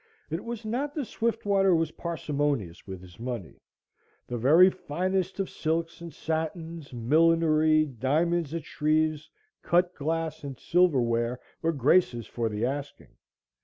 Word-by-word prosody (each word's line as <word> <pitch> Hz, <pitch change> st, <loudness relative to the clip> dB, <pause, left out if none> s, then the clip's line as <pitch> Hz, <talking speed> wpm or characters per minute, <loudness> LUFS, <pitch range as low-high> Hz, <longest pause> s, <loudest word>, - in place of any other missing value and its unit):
It 165 Hz, -, -3 dB
was 235 Hz, -1 st, -6 dB
not 270 Hz, +7 st, -2 dB
that 295 Hz, -4 st, -2 dB
Swiftwater 200 Hz, -5 st, +1 dB
was 160 Hz, -1 st, 0 dB
parsimonious 145 Hz, -, -3 dB
with 95 Hz, -2 st, -8 dB
is 90 Hz, +1 st, -15 dB
money 120 Hz, -7 st, -6 dB, 0.6 s
the 120 Hz, -, -5 dB
very 155 Hz, +10 st, +7 dB
finest 185 Hz, +3 st, -2 dB
of 195 Hz, -, 0 dB
silks 165 Hz, +1 st, -2 dB
and 170 Hz, -1 st, -7 dB
satins, 160 Hz, +1 st, -4 dB
millinery, 155 Hz, +4 st, +3 dB
diamonds 155 Hz, +5 st, 0 dB
at 165 Hz, -, -4 dB
Shreve's, 155 Hz, 0 st, 0 dB, 0.3 s
cut 175 Hz, +1 st, +2 dB
glass 160 Hz, +1 st, -3 dB
and 140 Hz, -3 st, -6 dB
silverware, 125 Hz, -9 st, +2 dB, 0.2 s
were 165 Hz, -, +1 dB
Grace's 135 Hz, -, +2 dB
for 115 Hz, -2 st, -2 dB
the 105 Hz, +2 st, -1 dB
asking. 140 Hz, +2 st, -5 dB
155 Hz, 130 wpm, -27 LUFS, 135-170 Hz, 0.6 s, very